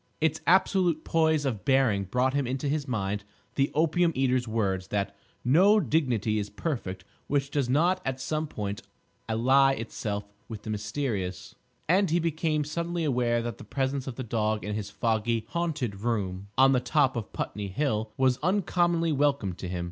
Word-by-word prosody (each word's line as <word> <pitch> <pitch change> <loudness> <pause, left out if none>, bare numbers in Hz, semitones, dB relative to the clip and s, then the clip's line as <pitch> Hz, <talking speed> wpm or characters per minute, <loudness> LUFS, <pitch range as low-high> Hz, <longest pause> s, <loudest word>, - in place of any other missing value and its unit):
Its 160 0 +1
absolute 180 -3 +3
poise 160 -2 +2
of 115 -7 -2
bearing 130 -8 +3
brought 125 +7 +1
into 135 0 -1
his 145 0 -1
mind 105 -4 -2 0.3
the 135 0 +1
opium 165 +2 +3
eater's 130 -2 +1
words 95 -4 -1
that 100 0 -2 0.3
"no 190 - +6
dignity 120 - +1
is 105 0 -4
perfect 105 - -4 0.2
which 140 0 0
does 140 -4 0
not 175 +7 +3
at 135 -1 -3
some 155 +3 -2
point 100 -5 -4 0.5
ally 135 +5 +4
itself 105 -4 -4 0.2
with 110 -2 -7
the 110 - -4
mysterious"; 105 -3 -3 0.3
and 190 +3 +3
he 165 - +2
became 160 -2 0
suddenly 170 +3 -3
aware 120 -5 +1
that 120 -3 -5
the - - -9
presence 135 0 -2
of 130 - -4
the 130 - -4
dog 110 -2 -1
in 105 0 -3
this 105 -2 -4
foggy, 110 +2 0
haunted 150 - -2
room 100 -5 -2
on 135 +1 +6
the 130 - +3
top 130 +1 +2
of 115 -3 -4
Putney 105 -1 -4
Hill 110 0 -1
was 130 -1 +2
uncommonly 175 -2 +1
welcome 140 -9 +1
to 90 - -7
him. 90 0 -3
130 Hz, 170 wpm, -28 LUFS, 105-155 Hz, 0.5 s, no